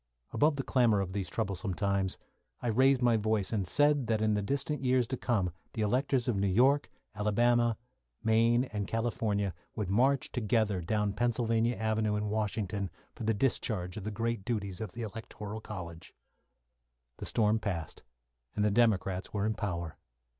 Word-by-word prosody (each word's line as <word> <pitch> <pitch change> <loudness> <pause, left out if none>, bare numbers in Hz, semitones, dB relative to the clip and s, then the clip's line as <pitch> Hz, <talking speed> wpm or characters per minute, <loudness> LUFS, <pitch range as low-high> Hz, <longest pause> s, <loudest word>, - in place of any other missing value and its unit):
Above 150 +1 +3
the 135 - -2
clamour 120 -7 +3
of 95 -1 -3
these 95 -2 -2
troublesome 100 -3 -2
times, 100 -2 0 0.4
I 120 - -2
raised 130 +3 +4
my 120 -2 +4
voice 110 -1 0
and 100 -4 0
said 145 +3 +3
that 110 -1 +1
in 110 0 +2
the 105 - +1
distant 140 +5 -2
years 130 -1 +3
to 130 - -1
come 105 -8 0 0.2
the 110 - -1
electors 125 +3 +1
of 120 - +1
New 100 0 +1
York, 130 +9 +3 0.2
Alabama, 120 +2 +2
and 125 0 -32
Maine, 115 +2 +4
and 105 -6 -4
California, 105 -4 -1 0.2
would 105 -4 -2
march 130 +6 +2
together 110 -5 +1
down 105 +3 0
Pennsylvania 115 0 +1
Avenue 110 -1 0
in 105 0 -1
Washington 105 -2 -2 0.2
for 115 - -6
the 110 0 +2
discharge 100 -6 -1
of 105 - -6
the 110 - -3
great 115 0 -2
duties 100 -4 -3
of 105 -5 -5
the 120 - -5
Electoral 110 0 -7
College. 85 -6 -8 1.0
The - - -6
storm 110 0 +2
passed, 85 -8 -4 0.5
and 105 - +1
the 105 - +3
Democrats 100 -4 +1
were 100 -1 -1
in 110 - +1
power. 85 -6 -4
110 Hz, 170 wpm, -31 LUFS, 100-120 Hz, 1.0 s, raised